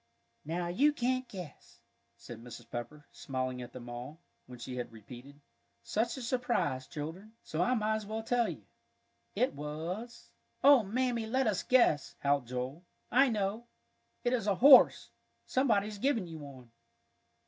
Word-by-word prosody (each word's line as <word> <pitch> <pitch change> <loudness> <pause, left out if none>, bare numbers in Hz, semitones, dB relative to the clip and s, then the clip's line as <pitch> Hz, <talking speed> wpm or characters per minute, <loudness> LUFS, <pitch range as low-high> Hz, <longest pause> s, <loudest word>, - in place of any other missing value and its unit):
"Now 170 +3 -2
you 275 +13 +3
can't 255 -1 -1
guess," 180 -7 -10 0.4
said 115 -2 -10
Mrs. 120 -1 -10
Pepper, 135 +5 -6
smiling 130 -2 -4
at 120 0 -8
them 120 -1 -10
all, 120 +6 -8 0.3
when 125 0 -10
she 125 +2 -7
had 125 - -4
repeated, 125 +6 -12 0.4
"such 230 +4 -1
a 260 - -6
surprise, 240 - -1
children," 165 +9 -7
"so 160 - -3
I 250 +8 +2
might 220 -1 +1
as 215 -2 -8
well 220 +1 -4
tell 240 +1 +1
you. - - -8 0.7
It 255 - +1
was 165 +11 -6
" - - -42
"Oh, 280 -3 +8
Mammy, 235 +2 -1
let 260 +4 +1
us 210 -5 +1
guess," 240 - +3
howled 140 -3 +1
Joel. 125 +6 -4 0.3
"I 265 +3 +5
know 215 +1 -2 0.6
it 245 0 +1
is 230 -5 -1
a 200 - +3
horse! 265 +6 +7 0.3
Somebody's 215 -6 +1
given 245 -5 +1
you 165 -2 -8
one." 130 -5 -12
195 Hz, 160 wpm, -32 LUFS, -, 0.7 s, Oh